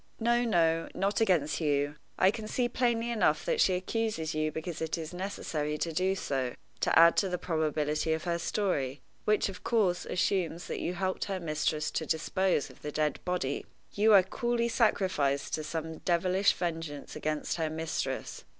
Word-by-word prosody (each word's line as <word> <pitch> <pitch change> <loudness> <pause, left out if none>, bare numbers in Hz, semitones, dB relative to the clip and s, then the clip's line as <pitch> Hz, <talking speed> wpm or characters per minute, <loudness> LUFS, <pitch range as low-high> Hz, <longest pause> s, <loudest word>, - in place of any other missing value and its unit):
"No, 240 +1 +2
no, 165 -7 +2
not 200 +3 0
against 165 -8 +2
you. 145 -1 +1 0.2
I 190 - +5
can 215 0 -6
see 245 +2 0
plainly 240 -1 0
enough 230 - +2
that - - +1
she 185 - +4
accuses 185 -4 -2
you 155 0 0
because 160 +2 -5
it 160 +1 -1
is 160 +1 -6
necessary 160 -5 -3
to 165 +1 -2
do 185 +3 +1
so 130 -8 -2 0.2
to - - +2
add 170 +1 +8
to 195 - +2
the 180 - -1
probability 155 -2 0
of 160 - -3
her 170 -1 -1
story, 145 -9 -1 0.3
which, 215 0 +3
of 195 -2 -8
course, 195 -7 +1
assumes 175 -2 0
that - - -4
you 180 - -2
helped 185 +2 -2
your 190 -1 -1
mistress 155 -2 -1
to 160 - -2
dispose 175 0 0
of - - -19
the 150 - -4
dead 150 -1 0
body. 180 -6 -1 0.3
You 215 +2 +4
are 195 -2 +8
coolly 235 +4 -1
sacrificed 185 - +1
to 155 - -1
some 160 0 -4
devilish 185 +3 +2
vengeance 165 -4 -4
against 155 +1 -2
her 160 -2 0
mistress. 160 +1 -3
170 Hz, 175 wpm, -30 LUFS, 155-195 Hz, 0.3 s, add